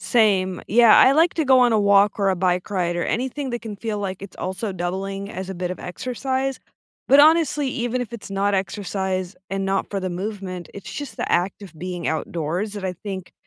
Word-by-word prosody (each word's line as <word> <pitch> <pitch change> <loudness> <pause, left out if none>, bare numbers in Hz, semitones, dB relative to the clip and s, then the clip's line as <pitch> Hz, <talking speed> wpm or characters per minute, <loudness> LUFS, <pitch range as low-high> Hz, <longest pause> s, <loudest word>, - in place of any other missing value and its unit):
Same. 195 -6 +2
Yeah, 230 +1 +7
I 265 - +7
like 325 +4 +3
to 320 - 0
go 260 -1 +6
on 245 -2 +4
a 215 - +3
walk 200 +1 +4
or 195 - +3
a 185 - 0
bike 180 +2 0
ride, 175 -3 0
or 175 - -1
anything 265 +3 -2
that 240 0 -3
can 215 -2 -6
feel 215 -1 -3
like 190 -1 -4
it's 200 - -10
also 190 +3 -3
doubling 195 +3 -4
as 190 0 -6
a 190 - -5
bit 180 0 -3
of - - -9
exercise, 260 +7 -3 0.5
but 275 - +7
honestly, 310 -2 +4
even 245 -1 -2
if 240 -1 -5
it's 220 -3 -8
not 200 +1 +1
exercise, 190 0 -2 0.2
and 195 0 -2
not 195 0 -1
for 200 - -2
the 185 -1 -3
movement, 185 -1 -5
it's 200 - -9
just 290 -1 -6
the - - -3
act 185 +3 0
of 185 -5 -10
being 180 -1 -4
outdoors 170 +6 -2
that 200 -2 -6
I 185 - -1
think 190 0 -7
195 Hz, 220 wpm, -22 LUFS, 185-235 Hz, 0.5 s, Yeah